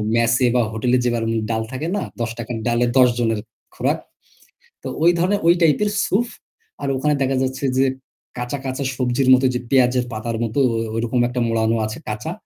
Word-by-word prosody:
মেসে 115 Hz, +2 st, +3 dB
বা 125 Hz, -, +4 dB
হোটেলে 120 Hz, +3 st, +1 dB
যেভাবে 120 Hz, -2 st, 0 dB, 0.3 s
ডাল 110 Hz, -, 0 dB
থাকে 135 Hz, +5 st, -4 dB
না, -, -, -1 dB, 0.2 s
১০ 115 Hz, -1 st, -1 dB
টাকার 120 Hz, +1 st, -5 dB
ডালে 120 Hz, +1 st, +2 dB
১০ 125 Hz, -1 st, +7 dB
জনের 115 Hz, -2 st, +1 dB, 0.4 s
খোরাক। -, -, 0 dB, 0.8 s
তো -, -, -5 dB, 0.2 s
ওই 175 Hz, -, +7 dB
ধরনের, 195 Hz, +4 st, +2 dB
ওই 170 Hz, -, +8 dB
টাইপের 170 Hz, +6 st, +3 dB, 0.2 s
স্যুপ। 235 Hz, +5 st, +1 dB, 0.5 s
আর -, -, -2 dB
ওখানে 150 Hz, +3 st, +1 dB
দেখা 135 Hz, 0 st, +1 dB
যাচ্ছে 130 Hz, +1 st, -3 dB
যে, 135 Hz, -, +4 dB, 0.5 s
কাঁচা, 125 Hz, +3 st, -3 dB
কাঁচা, 130 Hz, +1 st, -3 dB
সবজির 125 Hz, +1 st, +1 dB
মতো 130 Hz, +1 st, +4 dB
যে 125 Hz, -, -1 dB
পেঁয়াজের 125 Hz, -2 st, +3 dB
পাতার 115 Hz, +1 st, -3 dB
মতো 115 Hz, +4 st, -1 dB
ও -, -, -2 dB, 0.2 s
ওইরকম 120 Hz, +2 st, 0 dB
একটা 125 Hz, +1 st, -3 dB
মোড়ানো 115 Hz, 0 st, +1 dB
আছে 110 Hz, -, -6 dB
কাঁচা। 105 Hz, 0 st, -4 dB
125 Hz, 185 wpm, -21 LUFS, 115-135 Hz, 0.8 s, ওই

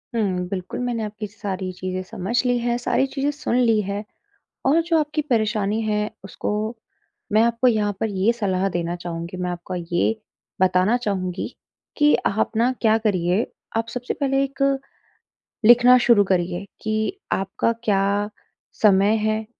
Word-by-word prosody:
हुँ, 185 Hz, -5 st, 0 dB
बिल्कुल 185 Hz, -1 st, -5 dB
मैंने 245 Hz, -2 st, -2 dB
आपकी 210 Hz, 0 st, -5 dB
सारी 195 Hz, -2 st, -5 dB
चीज़ें 185 Hz, 0 st, -4 dB
समझ 190 Hz, +4 st, -5 dB
ली 245 Hz, 0 st, +2 dB
है, 240 Hz, 0 st, 0 dB
सारी 245 Hz, +2 st, +1 dB
चीज़ें 275 Hz, +1 st, -1 dB
सुन 290 Hz, -4 st, -2 dB
ली 230 Hz, -3 st, +4 dB
है। 200 Hz, +1 st, -4 dB, 0.6 s
और 300 Hz, +5 st, +5 dB
जो 330 Hz, 0 st, +2 dB
आपकी 300 Hz, 0 st, 0 dB
परेशानी 215 Hz, -2 st, +1 dB
है 210 Hz, -1 st, 0 dB
उसको 195 Hz, -, -4 dB, 0.8 s
मैं 215 Hz, +1 st, +5 dB
आपको 235 Hz, +2 st, +3 dB
यहाँ 210 Hz, -3 st, +1 dB
पर 225 Hz, -, +1 dB
ये 200 Hz, +3 st, +2 dB
सलाह 195 Hz, -4 st, 0 dB
देना 175 Hz, -1 st, -2 dB
चाहूँगी, 170 Hz, +1 st, -6 dB
मैं 180 Hz, 0 st, -2 dB
आपको 175 Hz, +1 st, -6 dB
ये 175 Hz, +5 st, 0 dB, 0.4 s
बताना 185 Hz, +4 st, +3 dB
चाहूँगी 190 Hz, -6 st, -2 dB, 0.5 s
कि 295 Hz, -1 st, +5 dB
आप 210 Hz, +2 st, +1 dB
ना 240 Hz, +3 st, +3 dB
क्या 220 Hz, -1 st, +5 dB
करिए, 190 Hz, -2 st, +1 dB, 0.3 s
आप 225 Hz, 0 st, 0 dB
सबसे 250 Hz, +1 st, -4 dB
पहले 270 Hz, -1 st, +1 dB
एक 275 Hz, 0 st, -5 dB, 1.0 s
लिखना 245 Hz, +2 st, +8 dB
शुरू 235 Hz, -4 st, +5 dB
करिए 180 Hz, 0 st, 0 dB, 0.2 s
कि 220 Hz, -, -1 dB
आपका 195 Hz, +4 st, 0 dB
क्या 200 Hz, 0 st, +1 dB, 0.5 s
समय 200 Hz, 0 st, +5 dB
है? 215 Hz, 0 st, -1 dB
210 Hz, 155 wpm, -22 LUFS, 185-235 Hz, 1.0 s, लिखना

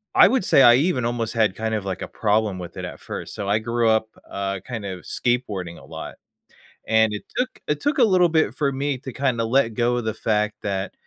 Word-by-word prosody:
I -, -, +8 dB
would 250 Hz, +1 st, +1 dB
say, -, -, +5 dB
I 120 Hz, -2 st, +8 dB
even 135 Hz, -3 st, +1 dB
almost 115 Hz, -2 st, -1 dB
had 110 Hz, -5 st, +2 dB
kind 110 Hz, +1 st, -2 dB
of, 105 Hz, -2 st, -3 dB
like, 95 Hz, -1 st, -4 dB
a -, -, -4 dB
problem 105 Hz, -3 st, 0 dB
with 90 Hz, -1 st, -8 dB
it -, -, -5 dB
at -, -, -8 dB
first -, -, -7 dB
So 100 Hz, -, -4 dB
I 105 Hz, -, +3 dB
grew 115 Hz, +1 st, 0 dB
up, 110 Hz, 0 st, +2 dB, 0.2 s
uh, 100 Hz, -1 st, -3 dB
kind 115 Hz, -5 st, -5 dB
of, 95 Hz, -2 st, -6 dB
skateboarding 105 Hz, -10 st, -2 dB
a -, -, -15 dB
lot, -, -, -8 dB, 0.7 s
and 110 Hz, -1 st, +3 dB
it 105 Hz, -, -5 dB
took 255 Hz, 0 st, +1 dB, 0.2 s
it 150 Hz, -1 st, -1 dB
took 290 Hz, -1 st, 0 dB
a -, -, +7 dB
little 185 Hz, -5 st, +4 dB
bit 160 Hz, -1 st, +2 dB
for 145 Hz, -3 st, 0 dB
me 140 Hz, 0 st, -2 dB
to 130 Hz, -2 st, -8 dB
kinda 130 Hz, -4 st, 0 dB
let 115 Hz, -1 st, +2 dB
go 120 Hz, +1 st, +1 dB
of 120 Hz, -, -3 dB
the 110 Hz, -, -1 dB
fact 105 Hz, -1 st, 0 dB
that, 95 Hz, -1 st, -3 dB
115 Hz, 240 wpm, -23 LUFS, 105-130 Hz, 0.7 s, I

